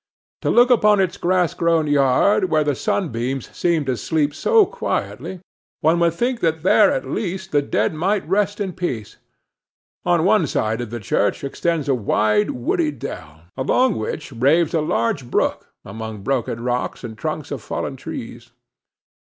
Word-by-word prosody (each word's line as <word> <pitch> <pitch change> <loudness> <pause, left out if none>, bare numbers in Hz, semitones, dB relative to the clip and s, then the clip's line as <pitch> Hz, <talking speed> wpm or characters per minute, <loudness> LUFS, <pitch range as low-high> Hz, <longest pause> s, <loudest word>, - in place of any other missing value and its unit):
To - - 0
look 245 +1 +5
upon 210 -4 +5
its 185 -2 +1
grass 180 -2 +1
grown 165 -2 +2
yard, 145 +8 +3
where 155 -1 +3
the 145 -1 +1
sunbeams 130 - -2
seem 170 -4 +1
to 130 -1 0
sleep 150 +3 0
so 450 - +4
quietly, 185 - -4 0.4
one 165 +3 +3
would 170 -1 +2
think 245 +4 -1
that 160 -1 0
there 205 -3 +5
at - - -2
least 190 -2 -4
the 145 - +3
dead 140 - 0
might 185 +4 -1
rest 205 +3 0
in 195 -3 -2
peace. 130 - -4 0.9
On - - +2
one - - +3
side 110 +2 -1
of 120 - -5
the 120 +1 -5
church 105 +1 0
extends 155 +2 -1
a 140 - +3
wide 105 -2 +1
woody 150 +6 0
dell, 80 - -8
along 195 - +2
which 140 +7 -4
raves 145 +7 +2
a 160 - +2
large 120 -2 -1
brook - - -1 0.2
among 110 -1 -7
broken 120 -3 -2
rocks 125 +1 -2
and 115 -2 -6
trunks 155 +4 -4
of 140 -5 -4
fallen 135 - -4
trees. 120 -2 -8
150 Hz, 165 wpm, -21 LUFS, 120-180 Hz, 0.9 s, look